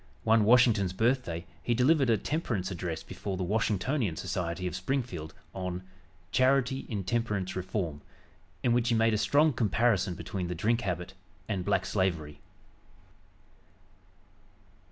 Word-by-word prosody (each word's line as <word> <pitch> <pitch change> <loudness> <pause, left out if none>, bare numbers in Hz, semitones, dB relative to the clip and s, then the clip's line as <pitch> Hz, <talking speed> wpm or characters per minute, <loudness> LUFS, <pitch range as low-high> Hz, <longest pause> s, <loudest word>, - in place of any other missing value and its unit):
One 110 -1 +4
Washington's 110 -5 +5
birthday 110 -6 0 0.2
he 120 - 0
delivered 135 +2 +4
a 115 - +4
temperance 105 - -2
address 85 -2 -4
before 95 -2 -5
the 95 - -2
Washingtonian 105 - 0
Society 90 +1 -3
of 90 0 -2
Springfield, 95 - -3 0.2
on 90 -1 -4 0.5
"Charity 130 +1 +2
in 100 -4 -2
Temperance 105 -2 -1
Reform," 90 -5 -3 0.6
in 120 - +3
which 120 0 +2
he 115 - +3
made 115 0 +3
a - - +2
strong 150 +4 +4
comparison 110 -5 +1
between 90 +1 -4
the 90 - -3
drink 115 +7 +1
habit 90 -2 -3 0.3
and 100 -4 -2
black 95 +1 +1
slavery. 85 -7 -1
100 Hz, 135 wpm, -29 LUFS, 90-120 Hz, 0.6 s, Washington's